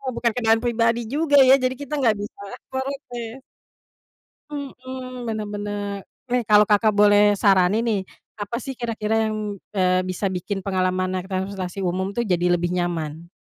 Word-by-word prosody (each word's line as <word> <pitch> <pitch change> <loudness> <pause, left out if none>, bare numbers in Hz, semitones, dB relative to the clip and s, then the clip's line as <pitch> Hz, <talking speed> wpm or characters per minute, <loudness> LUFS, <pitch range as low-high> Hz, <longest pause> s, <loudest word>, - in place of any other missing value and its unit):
bukan 235 0 +1
kendaraan 225 -1 +2
pribadi 230 -1 +2
juga 290 -1 +3
ya, 260 - +8
jadi 255 0 +1
kita 285 +1 -6
nggak 225 -5 +3
bisa 205 0 -8 0.3
protes. 265 -3 -5 1.1
Mhm, 255 -3 -7
bener 215 -1 -3
bener. 205 -1 -4 0.3
Eh, 250 0 +2
kalau 210 0 +7
Kakak 210 +1 +3
boleh 205 0 +5
saranin 200 +3 +3
nih, 215 -4 +1 0.4
apa 205 +3 -3
sih 265 +2 -5
kira-kira 225 -3 -3 0.2
yang, 210 -2 -4 0.2
eee, 185 -1 +3
bisa 185 +2 -3
bikin 190 +1 -4
pengalaman 185 -1 0
naik 185 +1 -4
transportasi 190 0 -3
umum 185 +2 -1
tuh 235 - 0
jadi 180 -3 +1
lebih 175 +1 -2
nyaman? 170 -2 -3
210 Hz, 150 wpm, -23 LUFS, 185-240 Hz, 1.1 s, ya